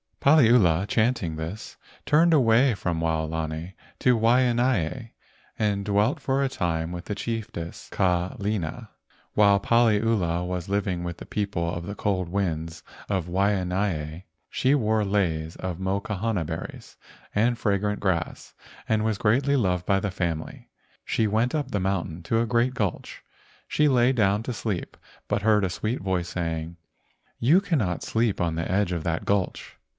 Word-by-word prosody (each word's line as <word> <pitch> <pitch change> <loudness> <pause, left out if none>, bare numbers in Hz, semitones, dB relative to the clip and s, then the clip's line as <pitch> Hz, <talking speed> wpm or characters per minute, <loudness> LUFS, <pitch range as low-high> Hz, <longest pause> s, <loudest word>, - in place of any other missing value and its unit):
Paliula, 115 - +5
chanting 110 -7 0
this, 80 +7 -7 0.3
turned 165 +3 +4
away 125 -2 +4
from 85 -4 -2
Wao¬ 80 -1 0
lani 80 +2 -4 0.2
to 125 -2 +3
Waianae 120 -2 +2 0.5
and 105 -2 0
dwelt 105 - +1
for 135 0 0
a 135 - +1
time 85 -6 -2
with 90 -1 -6
the 105 - -3
chiefess 105 -6 -5
Kalena. 95 +3 -1 0.4
While 100 -1 +5
Paliula 105 -6 +2
was 90 0 -4
living 100 -3 -1
with 85 -1 -5
the - - -9
people 95 -5 -2
of 85 -1 -5
the 100 - -5
cold 95 -5 -1
winds 80 -4 -2 0.3
of 95 -4 0
Waianae 90 -3 -1 0.3
she 135 +3 +2
wore 110 -4 +1
leis 85 -6 -1
of 90 -2 -4
mokahana 100 0 -2
berries 80 +1 -7 0.4
and 115 +3 +2
fragrant 105 -1 0
grass, 90 -5 -2 0.3
and 110 -1 +1
was 110 -2 0
greatly 130 +6 +2
loved 90 -8 0
by 95 0 +3
the 100 -1 -2
family. 85 -4 -4 0.3
She 110 - 0
went 110 +6 +1
up 145 -4 -2
the 100 - 0
mountain 90 -3 -2
to 115 +6 +1
a 120 - 0
great 120 +2 +2
gulch. 105 -9 -3 0.4
She 150 - +2
lay 125 -2 +4
down 105 -3 +2
to 125 - -3
sleep, 105 -6 -4 0.3
but - - 0
heard 105 -1 +4
a 95 - +1
sweet 110 +8 -2
voice 90 -2 -2
saying, 80 -1 -3 0.6
"You 145 +10 +5
cannot 130 - -1
sleep 115 -2 0
on 85 -2 0
the 85 +1 -3
edge 100 -1 +1
of 85 -3 -2
that 80 0 -2
gulch." 100 -2 -1
100 Hz, 155 wpm, -25 LUFS, 85-115 Hz, 0.6 s, Paliula